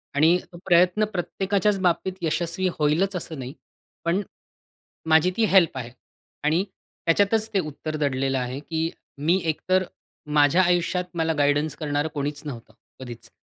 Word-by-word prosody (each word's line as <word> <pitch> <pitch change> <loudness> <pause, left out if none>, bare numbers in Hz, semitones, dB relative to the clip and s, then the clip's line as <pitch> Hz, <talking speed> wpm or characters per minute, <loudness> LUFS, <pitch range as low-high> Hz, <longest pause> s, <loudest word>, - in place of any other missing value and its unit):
आणि 160 +5 +5
तो 175 - -11
प्रयत्न 180 +4 +4
प्रत्येकाच्याच 195 +2 0
बाबतीत 185 +1 +1
यशस्वी 170 +2 0
होईलच 165 +6 +2
असं 160 -4 -4
नाही. 130 +2 -6 0.5
पण 170 +4 +2 0.9
माझी 160 +3 +5
ती 225 - +4
हेल्प 180 -7 +5
आहे. 120 -2 -5 0.5
आणि 160 +5 +2 0.4
त्याच्यातच 205 +6 +3
ते 195 - +3
उत्तर 155 -1 -5
दडलेलं 135 -2 0
आहे, 125 +2 -3
की 160 +2 -2 0.3
मी 165 +6 +2
एकतर 185 +4 +1 0.5
माझ्या 145 +5 +5
आयुष्यात 180 +1 +1
मला 160 0 +1
गाईडन्स 145 +1 +2
करणारं 145 -1 -1
कोणीच 145 0 -3
नव्हतं, 120 -6 -8 0.3
कधीच. 120 -3 -9
165 Hz, 140 wpm, -24 LUFS, 145-185 Hz, 0.9 s, आणि